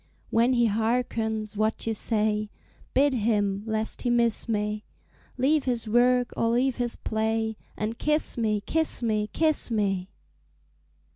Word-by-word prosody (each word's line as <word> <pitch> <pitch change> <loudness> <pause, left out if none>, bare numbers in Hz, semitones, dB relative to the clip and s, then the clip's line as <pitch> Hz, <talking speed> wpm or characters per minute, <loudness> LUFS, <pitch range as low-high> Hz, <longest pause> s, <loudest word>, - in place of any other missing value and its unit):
When 235 +3 +3
he 240 -1 +3
harkens 220 -1 -1
what 215 +1 -1
you 225 - 0
say, 215 -1 0 0.5
Bid 280 +1 +4
him, 205 -4 0
lest 220 0 -2
he 245 - -1
miss 235 -1 +1
me, 210 -1 -1 0.5
Leave 285 +3 +2
his 240 -3 -1
work 245 +2 +3
or 230 - +1
leave 250 +2 +1
his 240 -2 -1
play, 220 0 -1 0.2
And 220 +2 -3
kiss 300 +1 +2
me, 215 -3 0
kiss 320 -5 0
me, 215 -2 0
kiss 310 -4 +2
me! 195 -4 -1
225 Hz, 140 wpm, -26 LUFS, 215-245 Hz, 0.5 s, Bid